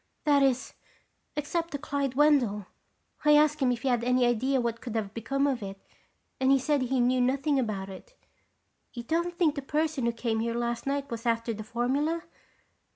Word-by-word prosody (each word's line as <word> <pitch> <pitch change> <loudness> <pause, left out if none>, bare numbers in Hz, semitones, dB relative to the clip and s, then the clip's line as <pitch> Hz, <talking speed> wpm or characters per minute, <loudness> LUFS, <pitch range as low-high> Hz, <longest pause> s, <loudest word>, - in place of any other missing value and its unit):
That 290 -2 +4
is, 265 -1 +1 0.6
except 330 +3 -2
to - - -1
Clyde 280 -2 -2
Wendell. 260 -9 +3 0.6
I 300 0 +6
asked 300 0 +3
him 260 -3 +2
if 235 -2 -3
he - - -1
had 240 -2 +1
any 250 0 +3
idea 255 +3 +1
what 235 -1 -2
could 235 -3 -6
have 210 -2 -2
become 275 +5 -1
of 270 -5 0
it 195 -1 -7 0.6
and 265 0 +2
he 275 - +6
said 285 +1 +1
he 255 +1 0
knew 250 +1 +3
nothing 275 +3 +1
about 210 -6 -2
it. - - -11 0.8
You 240 - -6
don't 340 +6 -1
think 325 -5 +3
the 285 - -4
person 300 -2 -1
who - - +2
came 230 -1 -2
here 230 +1 -1
last 235 +1 -2
night 280 -1 -2
was 230 +1 -4
after 230 0 0
the 215 0 -6
formula?" 275 +9 -1
260 Hz, 195 wpm, -28 LUFS, 235-285 Hz, 0.8 s, I